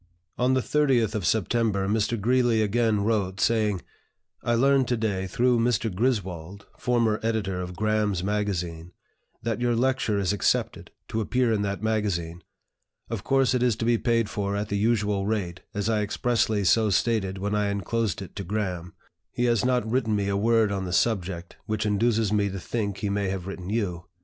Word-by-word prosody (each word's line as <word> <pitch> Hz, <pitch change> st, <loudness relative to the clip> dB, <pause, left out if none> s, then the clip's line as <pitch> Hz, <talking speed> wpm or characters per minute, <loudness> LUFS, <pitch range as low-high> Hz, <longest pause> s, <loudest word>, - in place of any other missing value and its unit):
On 125 Hz, +1 st, +2 dB
the 130 Hz, -, +2 dB
30th 130 Hz, -7 st, +2 dB
of 100 Hz, -6 st, -1 dB
September 110 Hz, -2 st, +1 dB
Mr. 110 Hz, +2 st, 0 dB
Greeley 120 Hz, 0 st, +2 dB
again 110 Hz, 0 st, +1 dB
wrote, 100 Hz, -3 st, 0 dB
saying, 105 Hz, -5 st, +1 dB, 0.6 s
"I 120 Hz, -, +1 dB
learned 135 Hz, +1 st, +3 dB
to 120 Hz, -, 0 dB
day, 100 Hz, -4 st, -1 dB
through 120 Hz, +4 st, +2 dB
Mr. 115 Hz, -3 st, +1 dB
Griswold, 100 Hz, -4 st, -2 dB
former 115 Hz, -3 st, +1 dB
editor 105 Hz, -5 st, -1 dB
of 90 Hz, 0 st, -6 dB
'Graham's 105 Hz, -3 st, 0 dB
Magazine,' 90 Hz, -5 st, -2 dB, 0.5 s
that 115 Hz, +1 st, -2 dB
your 120 Hz, -1 st, +2 dB
lecture 130 Hz, -3 st, +1 dB
is 100 Hz, -1 st, +1 dB
accepted, 105 Hz, -, 0 dB, 0.2 s
to 110 Hz, -, -1 dB
appear 125 Hz, +1 st, +1 dB
in 105 Hz, -, 0 dB
that 100 Hz, +1 st, -3 dB
magazine. 95 Hz, -6 st, -1 dB, 0.7 s
Of 110 Hz, -3 st, -3 dB
course 135 Hz, -1 st, +2 dB
it 125 Hz, -, +1 dB
is 125 Hz, -3 st, +3 dB
to 115 Hz, -, -3 dB
be 120 Hz, -1 st, +3 dB
paid 115 Hz, -2 st, +1 dB
for 100 Hz, -1 st, -2 dB
at 105 Hz, +1 st, -3 dB
the 100 Hz, -, -1 dB
usual 105 Hz, -3 st, +1 dB
rate, 95 Hz, -5 st, -2 dB
as 105 Hz, 0 st, -2 dB
I 110 Hz, -2 st, +1 dB
expressly 110 Hz, 0 st, 0 dB
so 110 Hz, +3 st, +3 dB
stated 100 Hz, -2 st, +1 dB
when 100 Hz, +2 st, -2 dB
I 105 Hz, -1 st, +1 dB
inclosed 100 Hz, 0 st, -1 dB
it 95 Hz, -, -12 dB
to 100 Hz, -, -3 dB
Graham. 90 Hz, -3 st, -3 dB, 0.4 s
He 120 Hz, -, -1 dB
has 115 Hz, -4 st, +2 dB
not 125 Hz, -3 st, +1 dB
written 115 Hz, -2 st, +1 dB
me 100 Hz, -1 st, 0 dB
a 100 Hz, -, 0 dB
word 110 Hz, 0 st, +3 dB
on 95 Hz, -1 st, -2 dB
the 90 Hz, -, -4 dB
subject, 90 Hz, -5 st, -1 dB
which 110 Hz, 0 st, -1 dB
induces 110 Hz, 0 st, +1 dB
me 100 Hz, -1 st, +2 dB
to 100 Hz, 0 st, -5 dB
think 100 Hz, 0 st, -3 dB
he 100 Hz, -2 st, -2 dB
may 100 Hz, -1 st, 0 dB
have 95 Hz, -2 st, -4 dB
written 95 Hz, -1 st, -6 dB
you. 95 Hz, -6 st, -2 dB
105 Hz, 185 wpm, -26 LUFS, 100-115 Hz, 0.7 s, learned